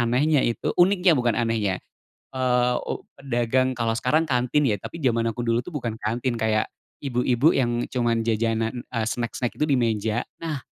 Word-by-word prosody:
anehnya 135 +5 +3
itu 120 - -1
uniknya 185 0 +5
bukan 120 -3 +1
anehnya, 110 -5 0 0.6
eee, 125 -1 +2
u - - -4 0.2
pedagang 130 0 0
kalo 115 -2 0
sekarang 155 +7 +2
kantin 125 +3 +2
ya, 105 - +1
tapi 165 - -8
jaman 115 -3 +2
aku 120 - -5
dulu 115 0 +1
tuh 175 - -9
bukan 120 -6 -3
kantin, 120 +3 -1
kayak 110 -1 +1 0.3
ibu-ibu 125 +1 +2
yang 120 -2 +1
cuma 120 -2 +1
jajanan, 115 +1 0
eee, 115 -3 -2
snack-snack 120 0 -2
itu - - +2
di 145 - +2
meja. 110 -1 0 0.2
Nah 155 -5 -4
120 Hz, 165 wpm, -24 LUFS, 115-130 Hz, 0.6 s, uniknya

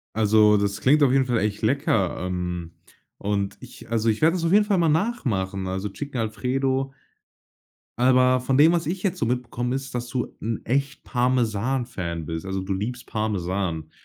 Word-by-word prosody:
Also, 105 -1 +5
das 100 0 -1
klingt 145 +3 +4
auf 135 - +5
jeden 135 -1 +4
Fall 120 -2 +1
echt 105 +1 -2
lecker, 110 - +1
ähm, 90 -2 -4 0.4
und 100 -1 -2
ich - - -12
also, 115 0 +1
ich 110 - -1
werde 160 +3 +4
das 170 - -2
auf 165 - +1
jeden 210 +1 +6
Fall 200 -3 +2
mal 165 -2 +3
nachmachen, 110 - -1
also, 95 +2 -3
Chicken 130 +4 -5
Alfredo. 130 +5 -1 1.1
Aber 130 0 +4
von 130 +1 0
dem, 160 +4 +6
was 170 -2 0
ich 180 +3 -3
jetzt 195 -4 -1
so 115 - 0
mitbekomme 125 0 -2
ist, 135 -1 -5
dass 120 0 -3
du 125 -1 -3
'n 115 0 -3
echt 140 +3 -1
Parmesan 125 0 0
Fan 85 -8 -5
bist, 80 +3 -5
also, 95 0 -2
du 95 +1 -3
liebst 120 +6 -4
Parmesan. 95 -6 -2
120 Hz, 185 wpm, -24 LUFS, 100-135 Hz, 1.1 s, jeden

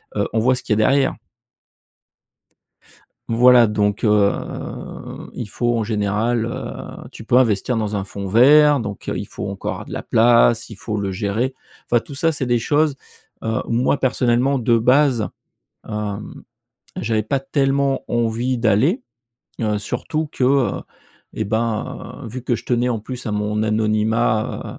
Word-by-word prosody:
heu, 100 - 0
on 110 - +2
voit 125 +3 +3
ce 125 - -7
qu'il 110 - 0
y - - +2
a - - -2
derrière. 135 0 +3 2.2
Voilà, 120 +1 +6
donc, 105 0 0
heu, 105 -2 -1
il 115 - -6
faut 120 +3 0
en - - 0
général, 110 +2 0
heu, 115 - -7
tu - - -10
peux 120 +3 +3
investir 120 0 +2
dans 105 -2 -2
un 100 - -1
fond 100 0 -6
vert, 145 +7 +6
donc, 105 -4 -6
heu, - - -2
il - - -4
faut - - -6
encore - - -4
avoir - - -8
de - - -8
la - - -4
place, 115 0 +4
il 110 - -9
faut 105 +2 -4
le 100 -1 -2
gérer 110 +7 -2 0.3
enfin 120 - +4
tout 140 - -11
ça, 165 +4 +1
c'est 140 -3 -3
des 120 -1 +2
choses, 150 +3 +1 0.5
heu, 110 0 -1
où - - -6
moi 125 +4 +1
personnellement 130 +1 +1
de 115 0 +3
base, 125 -1 +3 0.6
hem, 105 -1 -5 0.5
j'avais 110 -1 0
pas 110 +6 -1
tellement 135 0 0
envie 120 +2 0
d'aller, 120 - +2 0.6
heu, 105 -2 0
surtout 155 +9 -3
que, - - -4
heu, 135 -1 +2 0.5
eh 110 - -2
ben, 115 +5 -3
vu 125 +3 -7
que 120 -1 0
je - - -11
tenais 120 0 +1
en 120 -2 -1
plus 125 +4 -7
à - - -1
mon 105 +1 -1
anonymat, 110 +1 0
115 Hz, 165 wpm, -20 LUFS, 105-130 Hz, 2.2 s, Voilà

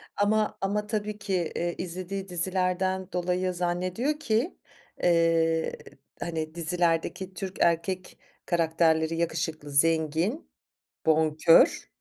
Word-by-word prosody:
Ama 215 +1 +1
ama 210 +2 -1
tabii 210 -1 -2
ki, 190 -5 -1
iii, 175 0 -1
izlediği 185 +2 -5
dizilerden 185 +1 -1
dolayı 180 +1 0
zannediyor 185 - -1
ki, 235 +4 0 0.5
eee, 165 -1 +3 0.4
hani 160 -1 -4
dizilerdeki 175 +2 -1
Türk 190 +1 -6
erkek 170 +2 0 0.3
karakterleri 165 -1 +2
yakışıklı, 160 -2 -2
zengin, 160 - +1 0.6
bonkör, 160 +1 +4
175 Hz, 95 wpm, -27 LUFS, 165-190 Hz, 0.6 s, bonkör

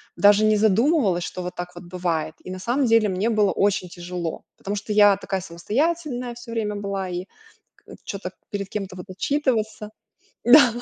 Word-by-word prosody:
даже 205 +1 +5
не 215 -1 +4
задумывалась, 215 - +3
что 180 - -5
вот 180 +1 -5
так 180 0 -6
вот - - -9
бывает. 170 -3 -2
И - - -9
на 185 - -5
самом 250 +7 +1
деле 225 -1 +4
мне 195 +3 0
было 210 -3 +3
очень 200 -2 +1
тяжело. 175 -1 -5 0.2
Потому 200 +1 -4
что 210 +1 -3
я 205 -1 +7
такая 195 -1 -3
самостоятельная 250 - -2
всё 240 0 -12
время 215 -2 -2
была 200 -2 -3
и, 180 +1 -4 0.5
к - - -30 0.2
чё-то 190 -2 -5 0.2
перед 200 -1 -4
кем-то 195 -3 -5
вот 180 - -8
отчитываться. 220 -2 -1 0.6
Да. 245 0 +8
205 Hz, 180 wpm, -23 LUFS, 185-230 Hz, 0.6 s, Да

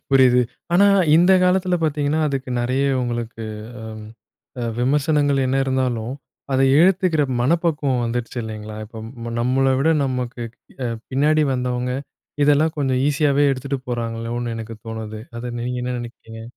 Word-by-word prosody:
புரிது. 130 -2 +5 0.3
ஆனா, 195 +3 +6 0.3
இந்த 175 +3 +5
காலத்தில 180 0 +2
பார்த்தீங்கன்னா 150 0 +1
அதுக்கு 135 -2 -3
நெறைய 130 +3 0 0.2
உங்களுக்கு 120 -2 -4 0.4
அ - - -8 0.8
அ - - -3 0.2
விமர்சனங்கள் 145 +2 +2
என்ன 130 +1 +1
இருந்தாலும், 130 -3 -1 0.4
அத 130 - +2 0.2
ஏத்துக்கிற 180 -3 +3 0.2
மனப்பக்குவம் 145 -3 +1
வந்துடுச்சு 120 +1 -3
இல்லங்களா, 110 -1 -7
இப்ப 115 +2 -8
நம்மள 130 +2 +2
விட 160 +4 +3
நமக்கு 125 -2 -3 0.7
பின்னாடி 150 +3 +3
அ - - +1
வந்தவங்க 125 0 -1 0.5
இதெல்லாம் 150 +2 +3
கொஞ்சம் 130 -3 +1
ஈஸியாவே 145 -1 +2
எடுத்துட்டு 135 +1 -3
போறாங்களோனு 115 0 -3
எனக்கு 115 0 -6
தோணுது 110 -1 -6 0.2
அத 120 +1 -5
நீங்க 125 +1 -3
என்ன 125 0 -2
நெனக்கிறீங்க? 115 -1 -9
130 Hz, 130 wpm, -21 LUFS, 120-145 Hz, 0.8 s, ஆனா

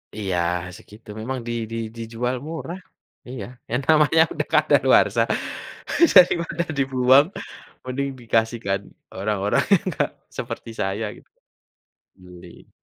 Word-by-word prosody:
Iya, 95 -4 -2 0.4
segitu. 105 +2 -17
Memang 130 +2 -3
di 120 - -2 0.2
di 115 - -3 0.2
dijual 115 +2 -3
murah. 165 +3 -6 0.5
Iya, 125 -5 -6 0.2
ya 120 - -1
namanya 155 0 +5
udah - - -3
kadaluwarsa - - +4 0.9
daripada 170 -2 +5
dibuang 135 +2 +4 0.6
mending 135 +2 -3
dikasihkan 115 -3 0 0.3
orang-orang 100 +1 0
yang 185 - +4
enggak 175 - -1 0.2
seperti 115 - -6
saya 100 +3 -1
gitu, - - -18 0.9
beli. 90 -1 -15
120 Hz, 110 wpm, -23 LUFS, 105-140 Hz, 0.9 s, namanya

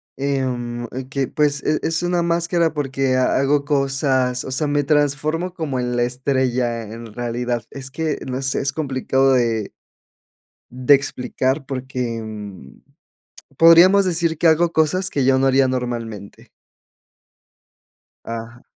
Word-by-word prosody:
em, 125 -3 -2
eh, 130 +1 -7
que 140 -1 -1
pues 145 -2 0
e 155 - +1
es 165 +1 -1
una 175 0 +1
máscara 170 -1 +1
porque 135 -2 -1
ha 130 - +2
hago 140 +1 +1
cosas, 135 -3 0
o 130 - -6
sea, 145 +3 0
me 145 0 +1
transformo 150 +4 0
como 150 -7 -3
en 125 0 -2
la 120 - +2
estrella, 125 -2 -1
en 115 +1 -10
realidad, 120 0 -3
es 135 -1 -7
que, 155 +1 -2
no 130 +1 -3
sé, 135 0 0
es 135 0 -1
complicado 135 -2 +1
de 115 -4 0 1.0
de 130 +3 +4
explicar 135 0 -1
porque, 125 -3 -4
mm, 105 -9 -9 0.8
podríamos 175 +4 +7
decir 170 -3 0
que 165 - +3
hago 165 +2 +3
cosas 185 +5 +1
que 140 -3 0
yo 130 0 +4
no 135 - +2
haría 135 0 +3
normalmente. 115 -5 -5 1.8
Ajá. 115 +1 -7
135 Hz, 140 wpm, -20 LUFS, 125-150 Hz, 1.8 s, podríamos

